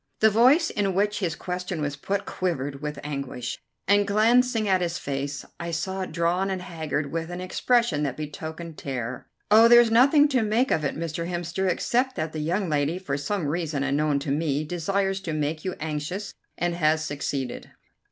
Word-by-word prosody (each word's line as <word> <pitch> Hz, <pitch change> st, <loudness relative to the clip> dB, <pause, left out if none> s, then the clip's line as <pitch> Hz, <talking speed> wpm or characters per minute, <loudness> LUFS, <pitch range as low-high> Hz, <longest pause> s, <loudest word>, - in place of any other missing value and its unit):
The 220 Hz, 0 st, +5 dB
voice 260 Hz, -, +5 dB
in 195 Hz, -3 st, 0 dB
which 205 Hz, +2 st, +1 dB
his 170 Hz, -6 st, -1 dB
question 180 Hz, 0 st, -4 dB
was 145 Hz, -1 st, -2 dB
put 200 Hz, +7 st, -2 dB
quivered 145 Hz, -6 st, -3 dB
with 150 Hz, -1 st, -4 dB
anguish, 140 Hz, -4 st, -4 dB, 0.3 s
and, 205 Hz, 0 st, +4 dB
glancing 225 Hz, +2 st, +3 dB
at 190 Hz, -2 st, +3 dB
his 175 Hz, -1 st, -1 dB
face, 140 Hz, +1 st, -4 dB
I 170 Hz, -, -4 dB
saw 190 Hz, +4 st, -2 dB
it 185 Hz, -, -4 dB
drawn 175 Hz, +3 st, +1 dB
and 190 Hz, -1 st, -2 dB
haggard 155 Hz, -4 st, -3 dB
with 165 Hz, 0 st, -3 dB
an 175 Hz, 0 st, -5 dB
expression 185 Hz, -2 st, +1 dB
that 140 Hz, -3 st, -2 dB
betokened 160 Hz, +2 st, -7 dB
terror. 130 Hz, -2 st, -4 dB, 0.2 s
"Oh, 225 Hz, +2 st, +8 dB
there's 240 Hz, -1 st, +7 dB
nothing 280 Hz, +6 st, +6 dB
to 260 Hz, -4 st, +2 dB
make 225 Hz, +5 st, +1 dB
of 155 Hz, -, +1 dB
it, 140 Hz, -, -1 dB
Mr. 165 Hz, +1 st, -3 dB
Hemster, 175 Hz, +2 st, -1 dB
except 250 Hz, +8 st, 0 dB
that 155 Hz, 0 st, -3 dB
the 155 Hz, -, -3 dB
young 175 Hz, +6 st, 0 dB
lady, 150 Hz, +2 st, 0 dB
for 165 Hz, -7 st, -3 dB
some 165 Hz, +5 st, -2 dB
reason 150 Hz, -2 st, -1 dB
unknown 145 Hz, +1 st, +1 dB
to 140 Hz, -, -3 dB
me, 150 Hz, 0 st, 0 dB
desires 195 Hz, +4 st, -1 dB
to 170 Hz, -5 st, -4 dB
make 155 Hz, +1 st, -2 dB
you 185 Hz, -, -3 dB
anxious 155 Hz, +6 st, -4 dB, 0.2 s
and 175 Hz, 0 st, 0 dB
has 155 Hz, -2 st, +2 dB
succeeded." 140 Hz, -3 st, -4 dB
170 Hz, 185 wpm, -25 LUFS, 150-200 Hz, 0.3 s, Oh